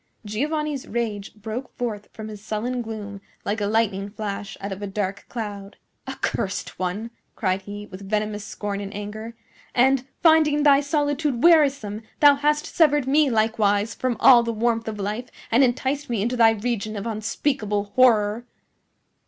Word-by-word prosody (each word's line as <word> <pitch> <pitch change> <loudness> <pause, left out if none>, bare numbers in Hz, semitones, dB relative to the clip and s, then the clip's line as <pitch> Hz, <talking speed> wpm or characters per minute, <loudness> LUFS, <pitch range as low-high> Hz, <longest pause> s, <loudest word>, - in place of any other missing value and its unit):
Giovanni's 295 +6 -2
rage 215 -4 -3
broke 220 +4 -6
forth 220 -4 -4
from 220 -1 -8
his 210 -1 -9
sullen 235 +4 -2
gloom 210 -3 -7 0.2
like 210 +1 -1
a 205 - +1
lightning 205 -2 0
flash 205 -1 -5
out 200 - -5
of 195 +1 -6
a 205 - -3
dark 195 0 -3
cloud. 205 -3 -6 0.3
"Accursed 195 +1 -3
one!" 195 +5 -3 0.2
cried 190 -2 0
he, 205 +1 -8
with 195 0 -10
venomous 210 0 -1
scorn 205 -1 -4
and 200 0 -6
anger. 215 +3 -6 0.4
"And, 260 +1 +3 0.2
finding 310 -3 +5
thy 285 -1 +6
solitude 290 -3 0
wearisome, 280 -11 +4 0.2
thou 290 -1 +8
hast 295 +1 +1
severed 295 -4 +3
me 290 +1 +4
likewise 215 -2 +1
from 255 -3 -2
all 245 -2 +8
the 235 0 -2
warmth 230 0 0
of 215 -1 -4
life 210 +5 -3 0.2
and 240 +4 +5
enticed 265 +3 0
me 225 -4 0
into 240 +3 -1
thy 230 -2 +6
region 220 -1 -2
of 200 +1 -5
unspeakable 215 -2 -2
horror!" 230 -2 +4
220 Hz, 160 wpm, -24 LUFS, 205-255 Hz, 0.4 s, thou